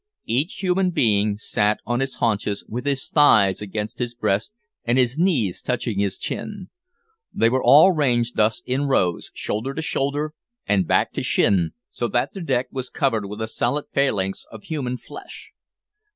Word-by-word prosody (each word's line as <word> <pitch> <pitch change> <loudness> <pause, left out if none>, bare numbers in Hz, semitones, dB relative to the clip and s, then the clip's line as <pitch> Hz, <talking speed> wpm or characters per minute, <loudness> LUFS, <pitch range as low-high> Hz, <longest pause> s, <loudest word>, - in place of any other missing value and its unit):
Each 140 - -1
human 185 0 +2
being 105 - +2
sat 105 -1 +1
on 120 +1 -1
his 135 0 -2
haunches 105 -3 -1
with 125 +5 -5
his 140 -2 -1
thighs 110 -11 +4
against 105 +3 -5
his 120 -1 -3
breast, 105 - 0 0.3
and 120 +2 +1
his 130 +3 +2
knees 135 - +1
touching 120 -4 -2
his 100 -1 0
chin. 205 -3 -5 0.6
They 115 +1 +2
were 130 +1 +1
all 155 +7 +8
ranged 120 -7 +1
thus 110 +11 +1
in 135 +3 -1
rows, 90 -10 +1
shoulder 125 +6 -3
to 160 - -2
shoulder, 145 +1 -1 0.3
and 95 -4 +1
back - - +2
to - - -2
shin, 90 -5 +2 0.2
so 120 - -2
that 120 +1 -1
the 195 - -7
deck 130 -6 0
was 130 -1 -5
covered 115 -7 0
with 105 +2 -5
a - - -3
solid 145 +6 -1
phalanx 100 -9 0
of 110 -2 -11
human 130 -6 -3
flesh. - - -11
120 Hz, 170 wpm, -22 LUFS, 105-140 Hz, 0.6 s, all